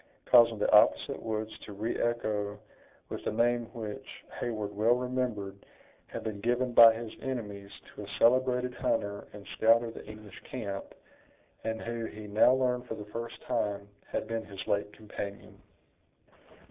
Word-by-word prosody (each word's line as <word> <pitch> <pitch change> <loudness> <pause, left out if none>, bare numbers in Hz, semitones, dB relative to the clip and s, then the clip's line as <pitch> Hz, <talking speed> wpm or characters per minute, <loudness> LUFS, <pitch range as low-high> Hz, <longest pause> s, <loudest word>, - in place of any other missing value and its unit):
causing 115 -2 +7
the 105 - +1
opposite - - +5
woods 110 -1 -3
to 105 - -8
re 110 +4 -2
echo 105 -3 -1 0.5
with - - -5
a - - +1
name 120 +2 +2
which, 110 -4 -6 0.3
Heyward 110 -3 -3
well 110 +4 +4
remembered, 125 -6 -3 0.4
had - - -6
been 105 -2 -4
given 120 +2 +1
by 115 -1 +10
his 115 -1 -6
enemies 105 -7 -5 0.2
to - - -8
a - - -7
celebrated 125 +1 +3
hunter 100 -4 -1
and 100 -1 -11
scout 115 +1 +5
of 115 -1 -5
the - - -9
English 105 -1 -11
camp, 100 -6 -4 0.8
and 110 0 -2
who, 115 0 -3
he 110 -1 -8
now 105 +4 +5
learned 125 -1 +1
for 115 - -4
the 105 - -8
first 115 0 -5
time, 105 -5 -1 0.2
had - - -2
been 115 0 -2
his 100 -2 -8
late 100 0 0
companion. 100 -2 -8
110 Hz, 160 wpm, -30 LUFS, 105-120 Hz, 0.8 s, by